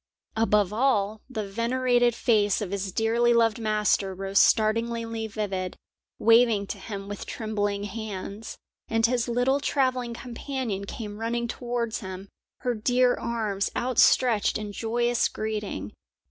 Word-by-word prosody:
Above 210 -3 +2
all, 215 -4 +1
the 215 -5 -4
venerated 240 +2 +1
face 210 -5 +2
of 205 -4 -4
his 200 -1 -3
dearly 235 +3 +2
loved 230 -1 +3
master 210 -3 +1
rose 195 +1 +1
startlingly 230 0 +2
vivid, 195 -4 -3 0.4
waving 230 -2 +4
to 200 - -6
him 195 0 -6
with 205 0 -6
trembling 205 -2 -2
hands, 210 0 -6 0.3
and 225 0 +2
his 245 0 +1
little 245 +3 +2
travelling 255 -4 0
companion 240 -4 -4
came 210 0 -7
running 235 +1 -1
towards 240 -1 -3
him, 190 -1 -8 0.3
her 250 -2 0
dear 245 +3 +2
arms 215 -4 -2
outstretched 245 -2 +3
in 210 -1 -5
joyous 235 +3 +1
greeting. 210 - -4
225 Hz, 130 wpm, -26 LUFS, 205-240 Hz, 0.4 s, waving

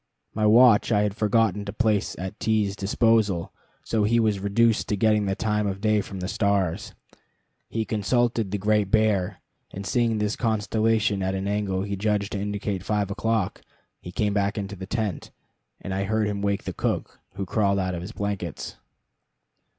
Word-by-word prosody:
My 110 0 +1
watch 115 0 +6
I 105 -2 +4
had 105 -1 -1
forgotten 105 -2 +1
to 100 - -4
place 110 -2 0
at 95 +3 -6
T 110 -1 +2
's 100 - -5
disposal, 100 -2 +1 0.3
so 110 -2 0
he 115 +3 +3
was 105 -3 +1
reduced 105 +3 +2
to 105 - +1
getting 105 0 +2
the 95 - 0
time 105 0 0
of 95 -1 -3
day 105 0 +2
from 95 -1 -7
the 90 - -3
stars. 100 -5 0 0.7
He 115 -1 -2
consulted 115 0 0
the 105 - -2
Great 105 0 +1
Bear, 105 -3 +1 0.3
and 100 +1 -7
seeing 115 +3 +1
this 105 0 0
constellation 110 -2 +1
at 95 0 -1
an 95 +1 -3
angle 100 -2 -1
he 100 0 -3
judged 105 0 -1
to 100 - -3
indicate 100 -1 -3
five 100 0 -1
o'clock, 110 -1 -1 0.4
he 90 - -8
came 105 +2 0
back 100 +1 0
into 100 0 -4
the 95 0 -8
tent, 110 -5 -3 0.5
and 95 - -5
I 95 +1 -1
heard 110 +1 +1
him 100 -1 -2
wake 100 0 0
the - - -5
cook, - - -3 0.2
who 100 -1 -3
crawled 100 0 +1
out 95 -1 -1
of 85 - -4
his 90 +5 -7
blankets. 100 -7 -4
105 Hz, 185 wpm, -25 LUFS, 100-110 Hz, 0.7 s, watch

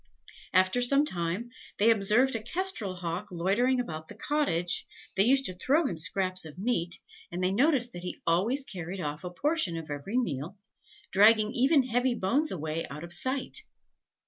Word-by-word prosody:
After 185 +6 +3
some 275 +4 +3
time, 180 - -3 0.3
they 220 +3 +5
observed 225 +5 +3
a 225 - -2
kestrel 245 - 0
hawk 180 +3 -4
loitering 205 +9 +1
about 160 -9 -5
the 210 - -11
cottage: 215 - -1 0.3
they 195 - +4
used 270 +4 +3
to 185 - -1
throw 280 - +1
him 185 - -2
scraps 185 +3 0
of 155 0 -10
meat, 180 -5 0 0.4
and 180 +1 -3
they 185 - +2
noticed 250 +2 +2
that 175 - -7
he 180 - -5
always 215 +12 +2
carried 185 -2 -6
off 150 0 -4
a 180 - -4
portion 240 - 0
of 160 -2 -7
every 145 - -3
meal, 170 - -2 0.5
dragging 215 +2 +5
even 270 +3 +4
heavy 245 0 0
bones 260 +10 +1
away 160 -1 -3
out 150 +3 -8
of 170 0 -4
sight. 260 +8 0
200 Hz, 170 wpm, -29 LUFS, 175-255 Hz, 0.5 s, they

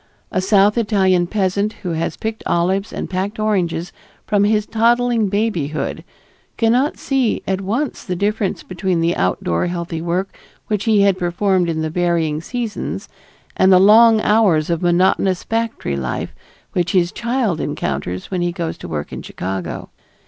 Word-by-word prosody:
A 185 - 0
South 205 +3 +4
Italian 190 -5 +2
peasant 200 +2 0
who 180 - -2
has 165 0 -2
picked 220 0 -4
olives 190 +4 0
and - - -4
packed 190 +3 -3
oranges 180 -6 -1 0.3
from 205 -2 +2
his 210 0 +2
toddling 235 -1 +2
babyhood 190 -8 -2 0.5
cannot 245 +6 +2
see 265 -5 0
at 190 0 -1
once 235 +9 -2
the 180 - -3
difference 200 +1 -1
between 185 -1 -2
the 165 +1 +1
outdoor 90 - 0
healthy 170 -2 -4
work 180 +3 -2 0.3
which 210 -2 -2
he 215 -3 +4
had 200 -2 +3
performed 180 0 +1
in 160 -1 -1
the 160 - -2
varying 165 -3 0
seasons, 235 +3 -4 0.5
and 190 0 +4
the 185 - +7
long 220 +3 +7
hours 195 -9 +3
of 170 - -1
monotonous 180 +1 +2
factory 225 - -2
life 65 -3 -3 0.4
which 175 -1 0
his 175 -2 +2
child 235 -7 -1
encounters 90 - -3
when 185 -2 -1
he 175 0 0
goes 170 -2 -4
to - - -8
work 75 -3 -5
in - - -5
Chicago. 95 -2 -5
190 Hz, 155 wpm, -19 LUFS, 170-215 Hz, 0.5 s, the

